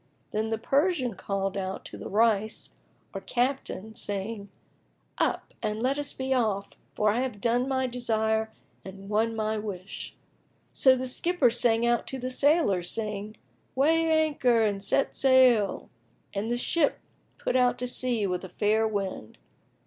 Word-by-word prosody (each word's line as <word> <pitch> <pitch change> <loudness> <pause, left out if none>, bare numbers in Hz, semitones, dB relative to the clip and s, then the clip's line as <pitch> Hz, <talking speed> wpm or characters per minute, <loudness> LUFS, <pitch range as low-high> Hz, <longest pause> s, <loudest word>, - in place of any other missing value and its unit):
Then 220 +1 -1
the 225 - -1
Persian 275 - +1
called 195 0 -3
out 190 -1 -4
to - - -9
the - - -7
Rais 220 0 +1 0.4
or - - -5
Captain, 245 -4 -2
saying, 205 0 -4 0.7
"Up - - -1
and 215 -1 -2
let 270 +3 +1
us 290 0 -2
be 265 0 -2
off, 215 -6 0 0.2
for 210 0 +3
I 225 - 0
have 250 -5 -3
done 240 +4 +1
my 260 -1 0
desire 220 -3 0 0.3
and 195 +1 -10
won 225 +2 +1
my 215 0 -1
wish." 195 -3 -7 0.6
So 260 -1 +5
the 260 0 -3
skipper 275 0 +1
sang 235 -1 +3
out 240 0 +1
to 265 - -4
the 255 0 -4
sailors, 255 - +2
saying, 210 -1 -4 0.4
"Weigh 325 +4 +3 0.2
anchor 250 -6 +2
and 200 -2 -1
set 270 - +1
sail!" 255 -6 +4 0.5
And 205 +3 -2
the 240 - 0
ship 295 +4 +1 0.4
put - - -2
out 250 -1 +3
to 250 - -3
sea 245 -3 +1
with 180 -1 -2
a 185 - -7
fair 215 +3 +1
wind. 195 - -4
225 Hz, 155 wpm, -27 LUFS, 210-255 Hz, 0.7 s, So